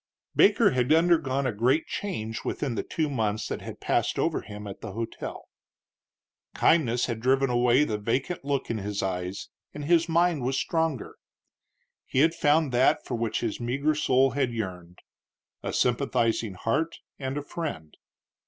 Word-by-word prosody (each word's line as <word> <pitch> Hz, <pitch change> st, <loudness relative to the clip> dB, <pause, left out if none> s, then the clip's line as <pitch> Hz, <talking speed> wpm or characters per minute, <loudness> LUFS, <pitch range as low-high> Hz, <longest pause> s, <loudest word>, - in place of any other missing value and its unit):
Baker 205 Hz, +1 st, +5 dB
had 130 Hz, +1 st, +1 dB
undergone 160 Hz, -5 st, +3 dB
a 130 Hz, -, +1 dB
great 125 Hz, +9 st, +2 dB
change 115 Hz, -, -4 dB
within 135 Hz, -5 st, -2 dB
the 115 Hz, -, -1 dB
two 160 Hz, -2 st, -2 dB
months 110 Hz, -6 st, -1 dB
that -, -, -4 dB
had -, -, -8 dB
passed -, -, 0 dB
over -, -, 0 dB
him 105 Hz, 0 st, -9 dB
at 100 Hz, -1 st, -8 dB
the 110 Hz, -4 st, -7 dB
hotel. 115 Hz, +2 st, -6 dB, 1.1 s
Kindness 125 Hz, -7 st, +3 dB
had 115 Hz, -3 st, -3 dB
driven 135 Hz, +2 st, +2 dB
away 125 Hz, +3 st, +4 dB
the 110 Hz, -7 st, -2 dB
vacant 130 Hz, +11 st, -2 dB
look 140 Hz, -3 st, -1 dB
in 115 Hz, -, -2 dB
his 100 Hz, 0 st, -3 dB
eyes 90 Hz, 0 st, -3 dB, 0.3 s
and 145 Hz, -1 st, -5 dB
his 170 Hz, +1 st, +3 dB
mind 170 Hz, -2 st, +2 dB
was 130 Hz, +2 st, 0 dB
stronger. 160 Hz, -6 st, -1 dB, 0.9 s
He 130 Hz, -, +2 dB
had 165 Hz, +2 st, +4 dB
found 150 Hz, -2 st, +2 dB
that 125 Hz, +2 st, +3 dB
for -, -, -5 dB
which 115 Hz, -2 st, -1 dB
his 115 Hz, -3 st, -2 dB
meagre 135 Hz, +6 st, 0 dB
soul 135 Hz, -3 st, +3 dB
had 135 Hz, -3 st, 0 dB
yearned 90 Hz, -6 st, -6 dB, 0.6 s
a -, -, -3 dB
sympathizing 120 Hz, -4 st, +1 dB
heart 130 Hz, -, -1 dB, 0.2 s
and 135 Hz, 0 st, -3 dB
a 145 Hz, -, -3 dB
friend. 145 Hz, -, -6 dB
130 Hz, 160 wpm, -27 LUFS, 115-150 Hz, 1.1 s, Baker